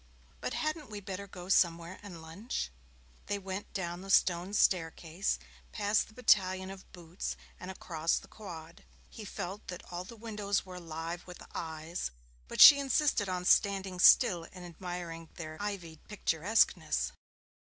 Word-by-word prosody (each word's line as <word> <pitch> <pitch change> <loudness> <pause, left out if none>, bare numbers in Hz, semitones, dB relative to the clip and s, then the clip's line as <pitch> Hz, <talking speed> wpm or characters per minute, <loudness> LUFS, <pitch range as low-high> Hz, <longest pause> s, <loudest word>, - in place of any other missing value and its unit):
But - - -3
hadn't 310 -3 -2
we 210 -1 -6
better 195 0 -6
go 180 -2 -9
somewhere 170 -1 +2
and 180 -6 -10
lunch?' 165 - -4 0.6
They 205 - 0
went 195 0 -6
down 175 -2 -4
the 195 - -9
stone 185 +1 +3
staircase, 165 - +1 0.3
past 205 - +1
the 220 - -17
battalion 190 -5 +3
of 195 -1 -12
boots, 175 0 -6 0.2
and 180 - -7
across 165 -3 -1
the - - -8
quad. 170 -6 -10 0.3
He 215 - -9
felt 195 +1 -6
that 180 - -6
all 175 +1 -4
the 210 +6 -11
windows 210 -3 -2
were 185 -1 -9
alive 165 0 -5
with 180 - -10
eyes, 160 - -4 0.4
but - - -6
she 285 - +12
insisted 275 -6 +2
on 180 -1 -2
standing 195 -2 +3
still 170 -2 +6
and 180 -1 -10
admiring 175 -1 -6
their 155 -2 -7
ivied 180 -6 -5
picturesqueness. 205 +1 +1
185 Hz, 150 wpm, -32 LUFS, 170-200 Hz, 0.6 s, she